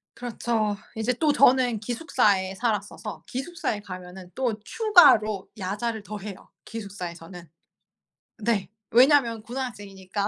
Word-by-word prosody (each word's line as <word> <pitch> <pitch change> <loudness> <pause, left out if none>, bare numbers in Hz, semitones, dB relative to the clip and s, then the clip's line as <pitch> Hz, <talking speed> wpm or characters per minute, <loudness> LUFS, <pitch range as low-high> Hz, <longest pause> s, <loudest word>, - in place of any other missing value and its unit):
그렇죠. 225 -3 -1 0.2
이제 220 +3 0
또 300 +4 +2
저는 255 -5 +4
기숙사에 210 - +1
살았어서 210 -1 -3
기숙사에 265 -6 -3
가면은 185 -1 -10
또 245 -5 -1
추가로 225 - +4
야자를 210 +4 -3
더 210 0 -6
해요, 200 -1 -9 0.2
기숙사에서는. 180 -5 -8 1.0
네 220 -4 0 0.2
왜냐하면 245 -2 +5
고등학생이니까. 205 -5 -5
215 Hz, 300 characters per minute, -25 LUFS, 195-245 Hz, 1.0 s, 왜냐하면